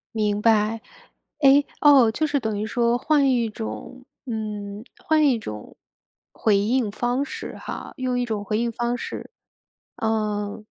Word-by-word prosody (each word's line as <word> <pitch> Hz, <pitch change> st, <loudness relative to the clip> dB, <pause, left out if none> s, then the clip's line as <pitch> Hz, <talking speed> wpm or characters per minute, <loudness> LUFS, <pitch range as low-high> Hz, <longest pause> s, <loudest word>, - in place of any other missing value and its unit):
明 210 Hz, -1 st, 0 dB
白。 220 Hz, 0 st, +3 dB, 0.6 s
哎， 280 Hz, 0 st, +6 dB, 0.2 s
哦， 275 Hz, -6 st, +7 dB
就 295 Hz, +8 st, 0 dB
是 290 Hz, -2 st, 0 dB
等 220 Hz, -4 st, -2 dB
于 210 Hz, -, -2 dB
说 235 Hz, +1 st, +1 dB
换 285 Hz, 0 st, +3 dB
一 235 Hz, -3 st, +1 dB
种 110 Hz, -, -7 dB, 0.2 s
嗯， 210 Hz, -2 st, -5 dB
换 310 Hz, -1 st, +3 dB
一 255 Hz, -4 st, +3 dB
种 105 Hz, -, -8 dB, 0.6 s
回 210 Hz, -3 st, +2 dB
应 225 Hz, +3 st, +1 dB
方 245 Hz, +6 st, -1 dB
式 -, -, -7 dB
哈 -, -, -7 dB
用 255 Hz, -2 st, -1 dB
一 245 Hz, -, +1 dB
种 215 Hz, -3 st, -3 dB
回 210 Hz, +2 st, -1 dB
应 235 Hz, +1 st, 0 dB
方 240 Hz, +1 st, -1 dB
式， -, -, -6 dB, 0.7 s
嗯 215 Hz, -1 st, -2 dB
225 Hz, 160 characters per minute, -24 LUFS, 210-255 Hz, 0.7 s, 哦